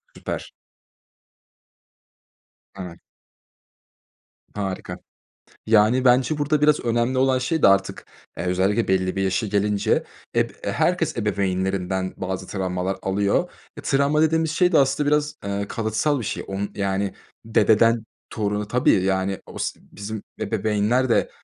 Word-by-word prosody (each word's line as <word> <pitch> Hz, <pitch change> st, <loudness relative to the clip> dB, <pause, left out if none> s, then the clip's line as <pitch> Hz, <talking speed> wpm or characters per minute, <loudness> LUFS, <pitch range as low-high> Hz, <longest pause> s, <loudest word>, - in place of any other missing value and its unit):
Süper. -, -, -6 dB, 2.2 s
Evet. 90 Hz, -3 st, -8 dB, 1.6 s
Harika. 95 Hz, -2 st, -4 dB, 0.7 s
Yani, 110 Hz, +4 st, +4 dB
bence 130 Hz, +4 st, +3 dB
burada 145 Hz, +1 st, +1 dB
biraz 150 Hz, 0 st, +4 dB
önemli 120 Hz, +2 st, 0 dB
olan 130 Hz, 0 st, +3 dB
şey 150 Hz, +5 st, -1 dB
de -, -, +8 dB
artık, 100 Hz, 0 st, +1 dB, 0.3 s
eee, -, -, -3 dB
özellikle 95 Hz, +5 st, +1 dB
belli 95 Hz, 0 st, +1 dB
bir 95 Hz, -, 0 dB
yaşa 95 Hz, +4 st, 0 dB
gelince 105 Hz, 0 st, +1 dB, 0.3 s
eb -, -, +2 dB
e, -, -, -1 dB
herkes -, -, 0 dB
ebeveynlerinden 95 Hz, -1 st, -1 dB
bazı 95 Hz, 0 st, -4 dB
travmalar 95 Hz, -1 st, -2 dB
alıyor. 100 Hz, +1 st, 0 dB, 0.3 s
E, -, -, -7 dB
travma 140 Hz, +3 st, +2 dB
dediğimiz 160 Hz, 0 st, +2 dB
şey 180 Hz, +3 st, +2 dB
de -, -, +5 dB
aslında 140 Hz, +2 st, +2 dB
biraz, 150 Hz, 0 st, +1 dB
eee, 100 Hz, 0 st, -2 dB
kalıtsal 115 Hz, +7 st, 0 dB
bir -, -, -5 dB
şey, -, -, -4 dB
onu 100 Hz, +1 st, -3 dB
yani 100 Hz, -1 st, -1 dB, 0.3 s
dededen 115 Hz, +1 st, +3 dB, 0.3 s
toruna 105 Hz, -1 st, -2 dB
Tabii, 120 Hz, -5 st, +3 dB
yani 95 Hz, 0 st, 0 dB
osi -, -, -5 dB
bizim 105 Hz, +1 st, -6 dB, 0.2 s
ebeveynler 110 Hz, +4 st, +1 dB
de 115 Hz, -, +2 dB
105 Hz, 130 wpm, -23 LUFS, 95-130 Hz, 2.2 s, de